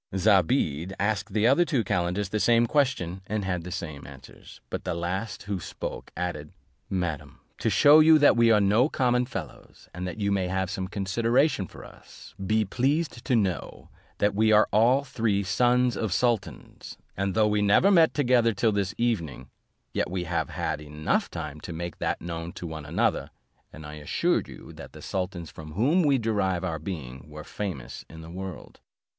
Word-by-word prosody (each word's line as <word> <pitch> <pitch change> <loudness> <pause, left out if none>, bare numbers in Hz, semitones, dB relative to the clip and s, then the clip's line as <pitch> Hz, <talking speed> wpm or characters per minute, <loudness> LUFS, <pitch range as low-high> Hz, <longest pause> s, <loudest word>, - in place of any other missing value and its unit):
Zobeide 95 - +2
asked 105 +1 -1
the 105 +2 +1
other 135 +8 +5
two 135 -8 0
calenders 95 0 -1
the 105 - -1
same 120 +2 +4
question, 120 - 0
and 105 -1 -2
had 90 -3 -2
the 90 - -7
same 75 -5 -6
answers; 65 -1 -14
but - - -4
the - - -2
last 95 +4 -4
who 100 -2 -3
spoke - - -7
added, 80 -4 -4 0.4
"Madam, 90 -6 -3 0.2
to - - +1
shew 150 +2 +7
you 160 0 +7
that 145 -3 +5
we 115 -1 +4
are 110 -2 +5
no 105 +8 +3
common 125 -3 +1
fellows, 95 -10 -9
and 90 +1 -5
that 90 - -6
you 100 -1 0
may 95 -2 0
have 95 0 -2
some 95 -1 -3
consideration 115 - +1
for - - -12
us, - - -15
be 110 +2 +1
pleased 135 - -1
to 125 - +2
know, 95 -6 -2 0.3
that 105 0 +2
we 110 +2 +3
are 105 0 +5
all 120 +6 +4
three 110 -6 0
sons 120 +5 +2
of 110 -4 -2
sultans; 115 0 -2 0.2
and 95 -1 -2
though 110 -1 +4
we 105 0 +1
never 105 - +4
met 165 -4 +5
together 120 -5 +3
till 110 +3 +2
this 100 -2 -1
evening, 85 - -2 0.4
yet - - -1
we 90 0 -2
have 85 0 -2
had 80 -1 -3
time 75 - -11
enough 75 +1 -1
to 75 -1 -7
make 85 +1 -6
that - - -1
known 85 0 -5
to 90 - -8
one 80 -2 -7
another; 80 - 0 0.4
and 80 -1 -11
I 75 +1 -8
assure 75 - 0
you - - -12
that - - -11
the - - -11
sultans 90 -3 -4
from 75 -1 -10
whom 140 - +3
we 145 -4 +3
derive 100 -6 0
our 80 -4 -2
being 75 -5 -7
were 75 0 -9
famous 75 -10 -6
in 80 0 -11
the 80 +1 -10
world." 95 +1 -8
100 Hz, 185 wpm, -26 LUFS, 85-115 Hz, 0.4 s, shew